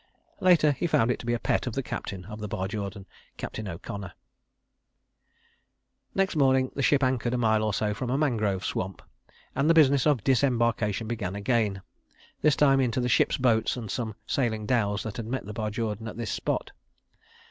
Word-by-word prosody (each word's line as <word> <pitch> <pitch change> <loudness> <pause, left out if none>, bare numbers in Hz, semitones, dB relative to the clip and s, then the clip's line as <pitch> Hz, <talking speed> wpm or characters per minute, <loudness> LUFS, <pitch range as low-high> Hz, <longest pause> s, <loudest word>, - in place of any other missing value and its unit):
Later 175 -5 +5
he 145 +5 -1
found 120 -6 +3
it - - -2
to 115 - -9
be 120 - +2
a - - +1
pet - - 0
of 125 - -2
the 135 - -1
captain 95 -6 -5
of 105 +2 -8
the 105 - -4
Barjordan, 100 -1 -4 0.3
Captain 110 -1 -5
O'Connor. 95 +2 -6 2.0
Next 195 -2 +1
morning 130 -3 +3
the 140 - -3
ship 140 +1 +3
anchored 125 -2 +1
a - - 0
mile 110 -2 +2
or 110 0 0
so 105 +1 0
from 120 +5 -4
a 130 - +1
mangrove 110 - 0
swamp, 95 +1 -3 0.5
and 140 +4 +2
the 165 - +5
business 140 -3 +5
of 140 -9 +2
disembarkation 115 -5 +1
began 105 -5 -3
again, 100 -2 0 0.6
this 150 -2 +4
time 135 -2 +4
into 130 -1 +1
the 125 0 0
ship's - - +3
boats 120 -2 +2
and 110 -5 -5
some 110 -2 -3
sailing 110 -5 -1
dhows 105 -4 +1
that 110 -2 -6
had 115 -2 -5
met 130 -1 -3
the 105 - -7
Barjordan 110 0 -3
at 110 - -7
this 115 -2 -3
spot. - - -2
115 Hz, 185 wpm, -27 LUFS, 105-130 Hz, 2.0 s, Later